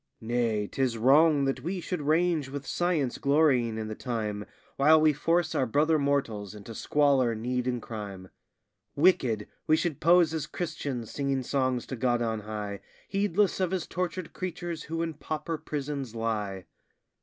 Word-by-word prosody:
Nay, 115 -2 0
'tis 130 -1 -1
wrong 140 +4 +5
that 135 - -1
we 180 +4 -3
should 175 -1 -3
range 155 -1 +1
with 140 0 -6
science 160 -6 0
glorying 140 -6 +3
in 110 -1 -3
the 110 - -4
time, 105 -4 -3 0.3
While 155 +3 +6
we 155 -1 +4
force 165 +3 +1
our 130 - +1
brother 155 +6 +3
mortals 115 -8 -1
into 105 +2 -9
squalor, 135 -2 +2
need, 125 +3 -2
and 125 -1 0
crime; 100 -5 -7 0.7
Wicked 135 - +3 0.2
we 155 - +5
should 160 -5 -1
pose 170 -1 +5
as 155 -2 -2
Christians 145 -9 -4
singing 135 -2 -1
songs 130 -2 0
to 130 - -5
God 120 0 +1
on 110 -1 -1
high, 105 -1 -5 0.3
Heedless 200 0 +1
of 185 -2 +1
his 185 -2 -2
tortured 180 -1 -4
creatures 175 -3 -5
who 165 +1 -2
in 165 -1 -3
pauper 155 +2 -4
prisons 140 -5 -4
lie. 105 -5 -2
140 Hz, 160 wpm, -28 LUFS, 115-160 Hz, 0.7 s, While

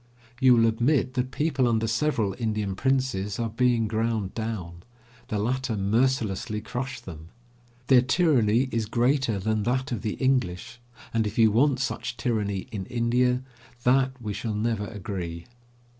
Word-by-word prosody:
You 130 -2 +6
will 115 -1 +4
admit 125 +4 +2
that 125 0 -1
people 135 -3 0
under 115 -1 +1
several 115 -4 0
Indian 105 -4 -1
princes 130 -6 0
are 115 -2 -2
being 120 -1 +2
ground 110 -2 -1
down. 95 -7 -5 0.5
The 105 - -2
latter 125 +2 -1
mercilessly 105 0 0
crush 125 +4 -5
them. 80 -2 -10 0.6
Their 125 -1 +6
tyranny 130 -4 +3
is 115 -2 -1
greater 125 -1 +1
than 110 +2 0
that 130 +4 -1
of 115 -5 -2
the 110 -2 -2
English, 120 -3 -1 0.3
and, 110 -2 +1
if 105 - -6
you 110 -2 +5
want 130 +4 +3
such 120 -1 -3
tyranny 105 -6 -1
in 100 -4 -5
India, 125 +1 +1 0.4
that 130 +1 +2
we 105 -3 -4
shall 105 +1 -3
never 105 -1 -1
agree. 90 -5 -6
115 Hz, 150 wpm, -26 LUFS, 105-130 Hz, 0.6 s, You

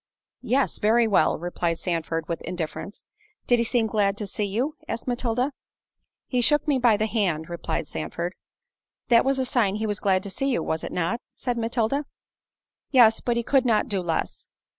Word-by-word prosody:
"Yes; 265 +2 0
very 225 +2 +4
well," 205 - +3
replied 170 0 -2
Sandford, 165 -2 -2
with 170 - -3
indifference. 175 +3 -6 0.4
"Did 245 -1 +3
he - - +3
seem 235 0 +1
glad 205 -2 +1
to 210 - -3
see 205 +1 -3
you?" 240 +10 -1
asked 230 +2 -4
Matilda. 245 +2 0 0.7
"He 250 -2 0
shook 295 +5 +3
me 280 -3 +2
by 235 -4 +4
the 215 - +1
hand," 180 -8 -1
replied 170 - -3
Sandford. 170 - -4 0.8
"That 235 -1 +6
was 270 0 +1
a 260 - 0
sign 225 -6 +1
he 220 +1 -2
was 210 -1 -2
glad 190 -2 +2
to 200 - -5
see 275 +7 -1
you, 250 - 0
was 160 0 -2
it - - -5
not?" 180 +8 -1
said 245 -1 -2
Matilda. 235 +5 0 0.8
"Yes; 235 -5 +5
but 240 -1 0
he 235 - 0
could 270 +2 +3
not 225 -4 +2
do 195 -2 0
less." 165 -2 -3
220 Hz, 185 wpm, -25 LUFS, 185-245 Hz, 0.8 s, That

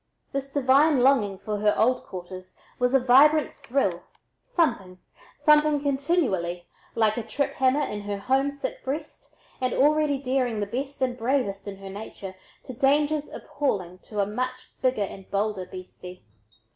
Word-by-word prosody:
This 275 0 -4
divine 275 +1 +4
longing 235 -7 +3
for 210 +1 -4
her 210 0 +3
old 250 +2 +2
quarters 185 0 -9 0.2
was 250 +1 +2
a - - +6
vibrant 280 +5 +5
thrill, 250 -11 -1 0.5
thumping, 235 - 0 0.5
thumping 300 -1 +5
continually, 265 - 0 0.3
like 220 -1 +2
a - - 0
trip 255 +6 -2
hammer 265 +2 +2
in 210 -6 -4
her 205 0 -4
homesick 270 +5 -1
breast, 295 +3 -6 0.3
and 255 -1 0
already 300 0 +3
daring 255 -4 -1
the 205 - 0
best 265 +6 -4
and 250 -1 0
bravest 230 -5 -1
in 195 -1 -6
her 195 0 -9
nature 200 -1 -8 0.3
to 255 - -8
dangers 290 +4 +1
appalling 185 -11 -3
to 210 +2 -7
a 200 - +3
much 255 +5 -4
bigger 255 -5 +1
and 195 0 -11
bolder 200 -2 -1
beastie. 185 -2 -11
255 Hz, 150 wpm, -26 LUFS, 200-280 Hz, 0.5 s, a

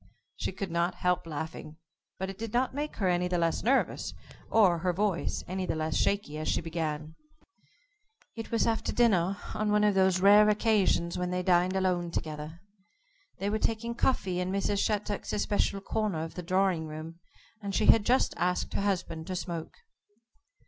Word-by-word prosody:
She - - -3
could 190 -1 -5
not 170 +1 0
help 180 -2 0
laughing, 155 0 -6 0.4
but 190 - -3
it 195 +1 -8
did 225 -1 -5
not 250 +2 +1
make 295 +2 -4
her 195 - 0
any 180 0 +1
the 180 0 0
less 165 -1 +1
nervous, 265 +4 0 0.3
or 190 -6 +4
her 180 +2 0
voice 195 -1 -1
any 185 +1 -3
the - - -1
less 155 0 -2
shaky 195 -7 0
as 155 - -4
she - - +1
began: 155 -2 -4 1.2
It 225 -1 -6
was 230 - +1
after 225 -1 0
dinner 200 -5 +2 0.2
on 215 -1 -1
one 210 0 +3
of 210 -1 +4
those 190 -1 +3
rare 205 +2 +7
occasions 205 -5 +2
when 180 0 -1
they 180 0 -1
dined 180 +1 +3
alone 180 -2 0
together. 155 0 -5 0.8
They 200 +1 -2
were 220 - 0
taking 230 +2 -1
coffee 190 -7 0
in 180 +1 -1
Mrs. 200 +1 0
Shattuck's 210 -1 -2
especial 205 -1 0
corner 200 -6 -1
of 165 - -7
the 180 - -5
drawing 180 -2 +1
room, 155 +2 -8 0.4
and 200 -2 -4
she - - +2
had 225 - +6
just 255 +5 +2
asked 180 0 -1
her - - -1
husband 180 -5 -2
to 185 - -3
smoke. 170 -3 -5
185 Hz, 180 wpm, -29 LUFS, 170-210 Hz, 1.2 s, rare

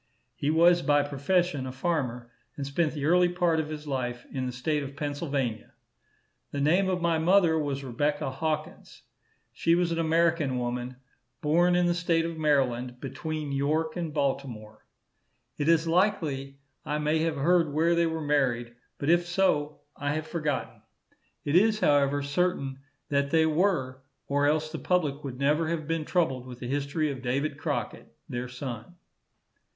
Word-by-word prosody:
He 145 - -1
was 170 +2 +5
by 145 -2 +3
profession 145 0 0
a - - -4
farmer, 130 -5 -2 0.3
and 140 - -3
spent 150 +3 0
the 145 -2 -3
early 175 +2 +4
part 175 -2 +1
of 155 -1 -2
his 155 -1 -6
life 125 -4 -3
in 130 -2 -2
the - - -3
state 145 +5 -1
of 140 0 -7
Pennsylvania. 145 -6 -3 0.8
The 140 - -4
name 175 +7 +3
of 180 -2 -1
my 165 -1 +2
mother 170 -1 +4
was 140 -2 -2
Rebecca 145 +2 -1
Hawkins. 155 +3 -4 0.5
She 165 - +2
was 175 -1 +1
an 165 - -1
American 165 -4 +2
woman, 125 +1 -3 0.5
born 175 +4 +3
in 180 0 +3
the 175 - +2
state 170 -1 +1
of 165 0 -4
Maryland, 130 -5 0
between 145 +3 -4
York 155 +3 0
and 170 -3 -3
Baltimore. 135 -7 -3 0.7
It 145 +2 +1
is 165 0 +3
likely 160 -7 0 0.3
I 150 - -2
may 150 +1 +1
have 160 0 0
heard 165 +2 +3
where 165 +4 +2
they 170 0 +3
were 160 0 -3
married, 125 -5 0 0.2
but 140 - -4
if 175 0 +3
so, 165 -5 +1
I 145 0 -2
have 155 0 -3
forgotten. 155 -3 -3 0.6
It 145 - 0
is, 215 +3 +4
however, 145 -4 +3
certain 140 -3 -1 0.3
that 140 -1 +1
they 160 0 +4
were, 155 -6 +1 0.2
or 145 +1 +1
else 155 +1 +1
the 160 - -5
public 150 -6 0
would 130 -3 -6
never 150 +4 +2
have 160 -2 -2
been 165 -1 -1
troubled 135 -9 0
with 125 -1 -8
the 125 - -6
history 145 +3 -1
of 130 -2 -7
David 140 +3 -1
Crockett, - - -4 0.2
their 120 +1 -4
son. 125 +3 -7
150 Hz, 165 wpm, -28 LUFS, 135-165 Hz, 0.8 s, was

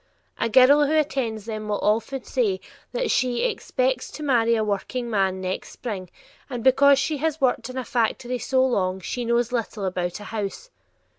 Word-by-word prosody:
A - - +1
girl 275 +5 +6
who 310 - +1
attends 240 -8 -1
them 215 -2 -5
will 210 -1 0
often 225 +5 0
say 415 -6 0 0.3
that - - -1
she 250 -2 +1
"expects 260 - -1
to 305 - -8
marry 235 -5 +3
a 220 - +1
workingman 200 -2 -1
next 185 0 -4
spring," 195 -7 -6 0.4
and 245 -3 -5
because 275 +1 +6
she 300 +2 0
has 315 +1 -1
worked 250 -3 +1
in 255 - -7
a 255 - -3
factory 245 0 -1
so 260 +2 +2
long 190 -7 0
she 245 +6 -4
knows 235 +1 +1
"little 225 -4 -2
about 180 -1 -2
a - - -9
house." 215 - -5
240 Hz, 175 wpm, -24 LUFS, 215-270 Hz, 0.4 s, girl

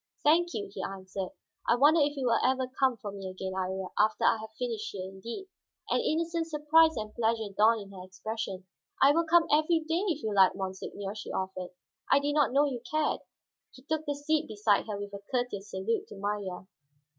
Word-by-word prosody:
"Thank 345 +4 +4
you," 410 - -3
he - - -5
answered. 190 -1 -5 0.4
"I - - +6
wonder 295 +6 +5
if 290 0 +1
you 265 - -1
will 235 -2 +3
ever 260 0 +2
come 260 -3 +3
for 205 -1 -6
me 195 -1 -6
again, 190 0 -5
Iría, 190 0 -3
after 215 +1 +3
I - - +5
have 220 0 -9
finished 230 -4 -3
here 190 -2 -5
indeed." 210 - -7 0.5
An - - +3
innocent 330 +1 0
surprise 320 0 +4
and 215 -1 -4
pleasure 225 -3 0
dawned 220 +2 +4
in 200 -1 -11
her 185 -2 -9
expression. 190 0 -5 0.4
"I 275 - +8
will 335 +3 +2
come 340 0 +5
every 315 +2 +3
day, 330 +2 +1
if 330 -9 -1
you 215 -1 -1
like, 190 -2 +5
monseigneur," 195 +1 -5
she 210 - -8
offered. 185 -1 -3 0.4
"I - - +7
did 290 +1 -1
not 290 -4 +3
know 280 +3 +4
you 255 -5 -3
cared." 310 -1 +1 0.6
He 260 - -15
took 315 +1 -2
the 290 - 0
seat 300 +2 0
beside 210 -1 +1
her, 205 -2 -4
with 205 0 -6
a 200 - -7
courteous 245 -5 -2
salute 195 +4 -2
to - - -10
Marya. 200 -2 -3
225 Hz, 205 wpm, -30 LUFS, 195-295 Hz, 0.6 s, I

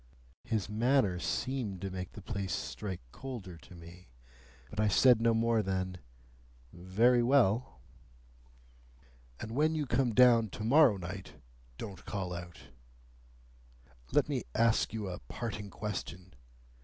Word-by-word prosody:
His 110 -4 -1
manner 110 -3 +2
seemed 105 +2 -2
to 95 -1 -4
make 90 -1 -6
the 105 - -10
place 100 -4 -3
strike 95 -4 -5
colder 115 -10 -7
to 90 - -15
me, 85 +2 -13 0.6
but - - -6
I 110 - +3
said 120 +3 +5
no 115 0 +4
more 115 0 +2
than, 95 -2 -3 0.7
"Very 110 +8 +3
well." 120 - +2 1.6
"And 110 - -6
when 155 +6 +2
you 150 -2 -1
come 120 -2 +1
down 120 -3 +6
to 105 - -5
morrow 130 -2 +5
night, 95 +1 -7 0.4
don't 100 -4 -8
call 95 -3 -4
out! 85 -1 -9 1.4
Let - - +3
me - - -2
ask 115 -1 +3
you 110 -3 -4
a 90 - -5
parting 105 - -6
question. 95 -2 -6
105 Hz, 130 wpm, -32 LUFS, 95-120 Hz, 1.6 s, down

